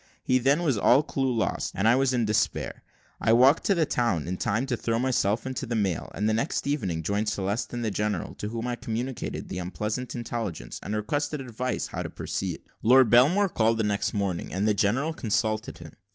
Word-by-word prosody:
Here, 130 0 +2
then, 140 +7 +3
was 140 -10 +1
all 130 +8 +5
clue 135 -4 -1
lost, 115 -2 -1
and 100 +4 +1
I 115 - +6
was 135 0 +2
in 120 -3 +1
despair, 105 0 -1 0.4
I 110 - +3
walked 130 +6 +5
to 200 - +3
the 165 -2 +2
town 115 - 0
in 90 - -2
time 110 +7 0
to 130 -3 -1
throw 115 0 -1
myself 115 -3 +1
into 130 0 -4
the 115 - -2
mail, 95 -7 -1
and 105 +2 0
the 110 - +2
next 115 +8 -1
evening 95 - -1
joined 105 +5 0
Celeste 100 +2 -2
and 120 -1 -3
the 110 - 0
general, 105 -2 -2
to 105 - -3
whom 115 +1 -4
I 125 -1 -1
communicated 120 +2 -4
the 90 - -5
unpleasant 105 +7 -4
intelligence, 115 - -4
and 105 - -4
requested 145 +8 -1
advice 125 0 -3
how - - -5
to - - -4
proceed. - - -4 0.2
Lord 125 0 +6
Belmore 155 +12 +5
called 115 -5 +2
the 110 - +1
next 105 +1 0
morning, 100 -4 -2
and 100 +3 0
the 105 - +4
general 120 +11 +1
consulted 110 -4 -1
him. - - -11
115 Hz, 210 wpm, -27 LUFS, 105-130 Hz, 0.4 s, I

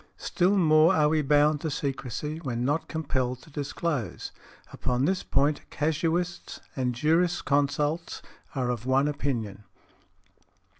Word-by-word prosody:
Still 190 +3 +1
more 160 0 +5
are 150 -2 +4
we 155 0 +2
bound 150 +1 +3
to 160 - -2
secrecy 140 +2 -3
when 125 -6 -3
not 145 +4 0
compelled 130 -5 -2
to 160 - -17
disclose. 145 - -3 0.4
Upon 125 +2 0
this 185 +2 +1
point 145 +2 +1
casuists 165 +3 -1 0.2
and 125 -2 -1
jurisconsults 150 0 +1 0.3
are 125 -2 0
of 120 0 -5
one 135 +2 +3
opinion. 120 -9 -3
145 Hz, 120 wpm, -27 LUFS, 130-160 Hz, 0.4 s, more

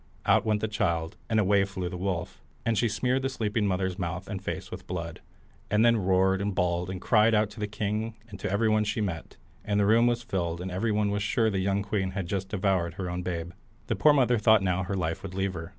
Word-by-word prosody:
Out - - +3
went 105 -1 +1
the 110 - 0
child, 85 -7 -1
and 110 -1 +2
away 100 0 +4
with 100 0 +1
it - - -15
flew 90 -2 -3
the 90 - -5
wolf, 90 -2 -3 0.2
and 115 - +2
she 115 +2 +2
smeared 125 +5 0
the 135 - -1
sleeping 110 -4 -1
mother's 95 0 -1
mouth 90 +1 -3
and 100 -3 -5
face - - -5
with - - -8
blood, 85 -2 -5 0.5
and 105 +2 +3
then 115 0 +5
roared, 95 -1 +2
and 100 -1 -2
bawled, 90 0 0
and 95 -1 -4
cried 110 +2 +4
out 105 0 +2
to 110 - -11
the 105 - -1
king 105 +2 -3
and 100 -3 -10
to - - -3
everybody 110 +1 +2
she 105 +2 -2
met, 95 -6 -4 0.3
and 105 0 0
the 100 - +3
room 115 +3 +5
was 120 0 0
filled, 85 -6 -2
and 90 +1 -5
everyone 105 +2 0
was 105 0 -1
sure 110 +1 +1
the 95 - -1
young 100 +1 0
queen 100 -2 -1
had 95 - -1
just 95 +1 -3
devoured 95 -4 0
her 90 -2 -4
own 90 +1 -3
babe. 85 -1 -4 0.3
The - - -1
poor 105 +10 +5
mother 125 -4 +3
thought 110 -1 +5
now 90 -1 +1
her 100 - -2
life 85 -3 -2
would 95 -1 -7
leave 95 0 -1
her. 80 -1 -6
100 Hz, 250 wpm, -28 LUFS, 90-110 Hz, 0.5 s, then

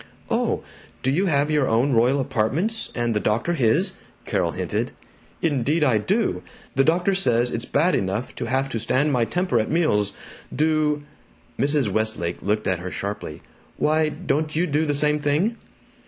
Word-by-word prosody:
"Oh, - - 0 0.4
do 130 - +2
you 185 +8 +1
have 145 -2 +2
your 150 -3 +2
own 120 +5 +2
royal 125 +4 +3
apartments, 135 - -1
and 120 -1 0
the 105 - +1
doctor 115 +12 0
his?" 165 - +2 0.3
Carol - - 0
hinted. - - -2 0.5
"Indeed 150 0 +1
I 125 -7 +3
do! 205 - 0 0.3
The 135 - +3
doctor 175 +6 +2
says 120 -10 +2
it's 115 +1 -2
bad 170 +6 +2
enough 100 +5 -1
to - - -3
have 130 +3 0
to 115 - -3
stand 135 +6 +1
my 120 -4 +2
temper 180 +8 0
at 110 - -1
meals. 150 - +1 0.4
Do 155 -1 +1 0.3
" - - -32
Mrs. 145 -3 +2
Westlake 110 -5 -1
looked 105 +1 -1
at 90 -2 0
her 90 +1 -5
sharply. 100 -6 -5 0.3
"Why, 155 0 +2
don't 155 -1 -2
you 170 +3 +2
do 155 -1 0
the 145 - +1
same 150 +1 +2
thing?" 150 +10 +1
140 Hz, 170 wpm, -23 LUFS, 115-155 Hz, 0.5 s, royal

